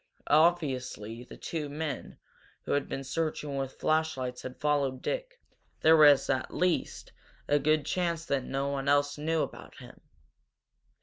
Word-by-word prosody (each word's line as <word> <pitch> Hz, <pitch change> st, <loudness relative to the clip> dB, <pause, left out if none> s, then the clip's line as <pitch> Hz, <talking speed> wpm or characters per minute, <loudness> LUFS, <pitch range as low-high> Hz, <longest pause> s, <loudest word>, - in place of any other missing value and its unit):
Obviously 135 Hz, -8 st, +1 dB
the -, -, -12 dB
two 155 Hz, -3 st, -4 dB
men 150 Hz, -2 st, -5 dB, 0.5 s
who -, -, -5 dB
had 145 Hz, -1 st, 0 dB
been 135 Hz, -, -4 dB
searching 150 Hz, 0 st, -2 dB
with 135 Hz, -1 st, -3 dB
flashlights 155 Hz, -6 st, 0 dB
had 130 Hz, 0 st, -8 dB
followed 140 Hz, -3 st, 0 dB
Dick, -, -, -3 dB, 0.4 s
there 160 Hz, +1 st, +7 dB
was 145 Hz, -3 st, +7 dB
at 130 Hz, -1 st, -1 dB
least 180 Hz, -1 st, -1 dB, 0.4 s
a 145 Hz, -, +3 dB
good 155 Hz, 0 st, +2 dB
chance 170 Hz, -2 st, -1 dB
that 140 Hz, -5 st, 0 dB
no 135 Hz, +2 st, -2 dB
one 140 Hz, 0 st, -1 dB
else 145 Hz, 0 st, +2 dB
knew 160 Hz, +1 st, +1 dB
about -, -, -8 dB
him. -, -, -13 dB
145 Hz, 145 wpm, -29 LUFS, 135-160 Hz, 0.5 s, there